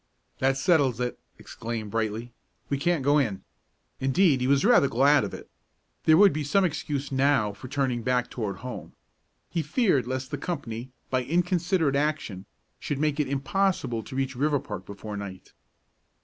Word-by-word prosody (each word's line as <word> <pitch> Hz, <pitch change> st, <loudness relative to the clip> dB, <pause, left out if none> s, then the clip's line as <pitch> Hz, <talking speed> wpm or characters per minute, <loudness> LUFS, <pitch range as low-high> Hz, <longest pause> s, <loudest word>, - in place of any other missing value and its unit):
"That 135 Hz, +1 st, +2 dB
settles 135 Hz, -5 st, +3 dB
it!" 125 Hz, 0 st, -2 dB, 0.2 s
exclaimed 110 Hz, -2 st, -6 dB
Brightly; 115 Hz, +2 st, -2 dB, 0.4 s
"we 140 Hz, -, 0 dB
can't 170 Hz, -2 st, +1 dB
go 145 Hz, +2 st, +4 dB
in." 110 Hz, -9 st, -1 dB, 0.6 s
Indeed, 135 Hz, +1 st, +3 dB
he 125 Hz, -, +1 dB
was 140 Hz, +6 st, +3 dB
rather 235 Hz, -, +6 dB
glad 140 Hz, +3 st, +4 dB
of -, -, -3 dB
it. -, -, -9 dB, 0.6 s
There 160 Hz, 0 st, +6 dB
would 200 Hz, 0 st, +7 dB
be 150 Hz, +1 st, -2 dB
some 190 Hz, +7 st, +2 dB
excuse 145 Hz, -4 st, -3 dB
now 135 Hz, -6 st, +2 dB
for 105 Hz, +6 st, -10 dB
turning 130 Hz, -3 st, -1 dB
back 125 Hz, +1 st, +1 dB
toward 105 Hz, -6 st, -4 dB
home. 125 Hz, -, -7 dB, 0.6 s
He 170 Hz, -, 0 dB
feared 155 Hz, -, +1 dB
lest 130 Hz, 0 st, -4 dB
the -, -, -3 dB
company, 130 Hz, -8 st, -4 dB, 0.2 s
by 130 Hz, -1 st, +1 dB
inconsiderate 170 Hz, 0 st, +1 dB
action, 140 Hz, -10 st, -2 dB, 0.3 s
should 145 Hz, -, -3 dB
make 150 Hz, +1 st, 0 dB
it 150 Hz, -, +1 dB
impossible 140 Hz, -3 st, 0 dB
to 130 Hz, -, -10 dB
reach 135 Hz, 0 st, -1 dB
Riverpark 130 Hz, -9 st, -1 dB
before 105 Hz, +1 st, -7 dB
night. 95 Hz, -2 st, -8 dB
135 Hz, 165 wpm, -27 LUFS, 120-150 Hz, 0.6 s, would